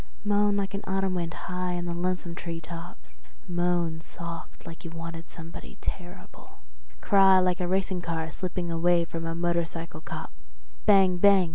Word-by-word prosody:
Moan 205 0 +3
like 195 -1 -1
an 200 - -2
autumn 195 0 +1
wind 170 -2 -1
high 180 +1 -3
in 175 0 -2
the 170 - -2
lonesome 180 0 -1
tree 170 -1 -5
tops, 170 +2 -10 0.3
moan 175 -2 +1
soft 170 0 -8
like 165 -1 -9
you 170 - -5
wanted 165 0 -7
somebody 165 0 -9
terrible, 180 0 -7 0.4
cry 195 -2 +7
like 180 -1 +3
a 180 - 0
racing 190 0 0
car 160 -1 -2
slipping 180 -1 -3
away 170 +1 +3
from 165 0 -4
a 165 - -2
motorcycle 170 -1 -1
cop, - - -6 0.5
bang 190 -3 +6
bang! 195 -2 +6
175 Hz, 160 wpm, -28 LUFS, 165-185 Hz, 0.5 s, cry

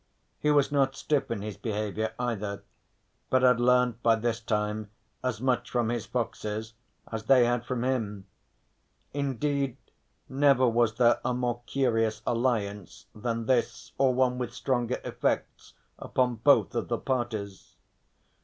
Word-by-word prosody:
He 150 - +1
was 145 -1 +3
not 135 -2 +2
stiff 145 -2 0
in 110 -4 -3
his 105 -2 -6
behaviour 110 0 -2
either, 105 -5 -3 0.7
but 130 0 +3
had 125 -2 +5
learnt 125 -1 +3
by 115 -1 +4
this 115 +1 -1
time 105 -1 -2 0.3
as 125 -4 -1
much 130 0 0
from 120 -2 0
his 120 -2 -2
foxes 110 -2 -3 0.4
as 110 -1 -4
they 125 0 +6
had 120 0 0
from 125 -2 -2
him. 110 -7 -2 0.9
Indeed 140 -1 -1 0.5
never 135 -2 +4
was 115 -2 +2
there 120 -1 +4
a 125 - 0
more 120 -1 -1
curious 115 -5 0
alliance 110 -5 -1
than 115 +1 -3
this 115 -2 0
or 135 -1 +4
one 125 -1 +2
with 125 -2 -4
stranger 125 -2 -1
effects - - -2 0.2
upon 125 -2 0
both 140 +5 +4
of 120 - -2
the 120 - -1
parties. 110 -7 -4
120 Hz, 145 wpm, -28 LUFS, 110-130 Hz, 0.9 s, they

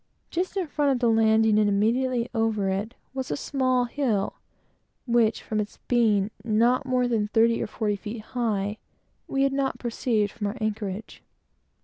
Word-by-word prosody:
Just 370 +3 -2
in 375 - 0
front 295 -2 0
of 265 - +2
the 240 -1 +2
landing, 220 -1 +4
and 210 -1 +3
immediately 235 +4 +1
over 220 -4 +1
it, 205 +5 -3 0.2
was 265 -1 -4
a - - -1
small 255 -3 +1
hill, 235 -6 -1 0.7
which, 235 -3 +2
from 215 - -2
its 210 0 -4
being 215 -4 +2
not 235 +4 +2
more 250 -1 +2
than 220 -3 0
thirty 230 +2 +3
or - - -2
forty 210 -1 -1
feet 215 +2 -6
high, 215 -4 -1 0.5
we 270 0 +1
had 275 0 +2
not 275 -1 0
perceived 230 -3 0
from 210 -3 -3
our 205 +5 -4
anchorage. 215 -1 -4
225 Hz, 165 wpm, -26 LUFS, 210-255 Hz, 0.7 s, landing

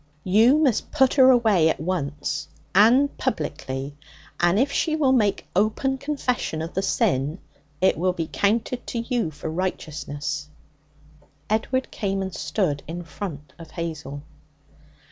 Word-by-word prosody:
You 225 +9 +5
must 275 -8 +1
put 265 -4 +3
her 260 -2 +7
away 220 -10 +4
at - - -1
once 155 -2 -3 0.3
and 245 +8 +5
publicly; 145 - -3 0.4
and 175 +2 +3
if 270 +5 +2
she 310 +2 +1
will 285 -4 +3
make 210 -6 +2
open 220 +7 +1
confession 255 - -2
of 165 - -6
the 190 - 0
sin, 165 - 0 0.4
it 185 - +3
will 180 +1 +2
be 165 -3 -3
counted 230 +4 0
to - - -4
you 230 -5 -1
for 155 +1 -8
righteousness.' 150 -4 -3 1.0
Edward 260 +4 0
came 195 -1 -2
and 190 -1 -5
stood 160 -10 -1
in 175 +2 -5
front 150 -2 -7
of 165 -1 -10
Hazel. 155 -5 -5
190 Hz, 140 wpm, -24 LUFS, 155-240 Hz, 1.0 s, her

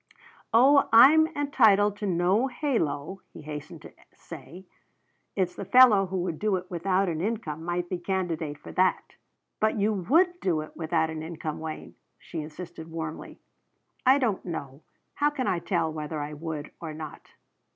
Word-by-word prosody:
"Oh, 275 +5 +5
I'm 290 +8 +8
entitled 215 -8 +4
to 205 - -3
no 185 +7 +2
halo," 195 - -2
he - - -11
hastened 150 +2 -8
to - - -12 0.2
say. 185 +3 -11 0.7
"It's 185 -3 0
the - - -6
fellow 205 -2 +6
who 190 +1 -3
would 170 -4 -4
do 210 -2 +1
it 185 0 -6
without 185 +2 0
an 165 -2 -2
income 180 -7 -3
might 175 +1 -2
be 180 0 -4
candidate 170 -5 -3
for - - -11
that." 185 0 +1 0.5
"But 215 +1 +1
you 210 +1 +1
would 335 - +2
do 170 -5 0
it 155 - -11
without 160 -1 0
an 160 -1 -5
income, 160 -1 -5
Wayne," 160 -1 -7 0.2
she 165 - -7
insisted 165 +1 -9
warmly. 160 -1 -7 0.6
"I 265 +1 +6
don't 230 -8 -1
know. 145 -5 -6 0.3
How 295 +1 +2
can 275 -3 -3
I 175 - 0
tell 165 -3 -1
whether 155 0 -5
I 145 +1 -5
would 155 -1 -6
or 160 -2 -6
not? 155 -1 -8
180 Hz, 165 wpm, -27 LUFS, 160-215 Hz, 0.7 s, I'm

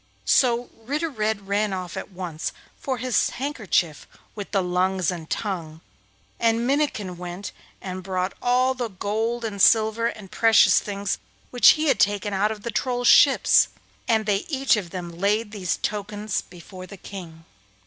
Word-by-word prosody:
So 245 -1 +2
Ritter 295 +8 -3
Red 215 -4 -2
ran 205 0 0
off 180 -2 -5
at - - -6
once 175 -4 -5 0.3
for 265 -2 -3
his 250 -1 +1
handkerchief 215 - -2 0.3
with 205 -2 -7
the 195 -3 0
lungs 180 0 0
and 165 -3 -7
tongue, 165 -6 -4 0.6
and 230 0 +2
Minnikin 250 -10 -1
went 180 +2 -6 0.3
and 185 -1 -5
brought 185 0 -2
all 255 +1 +2
the 245 -3 -4
gold 220 +5 -2
and 200 -3 -4
silver 220 +2 +4
and 210 -5 -7
precious 225 -1 +5
things 200 -1 -3 0.3
which 245 - +7
he 310 - -1
had 270 - +2
taken 205 0 +1
out 205 +3 +1
of 215 -1 -7
the 235 - -3
Trolls' 245 +2 -1
ships; 280 - +6 0.4
and 220 -1 +2
they 205 -2 +2
each 270 -4 +2
of 200 -5 -4
them 175 -1 -6
laid 210 +3 +1
these 190 -5 -2
tokens 210 0 -2
before 185 +1 -12
the 200 - -11
King. 170 -4 -10
205 Hz, 160 wpm, -24 LUFS, 185-235 Hz, 0.6 s, which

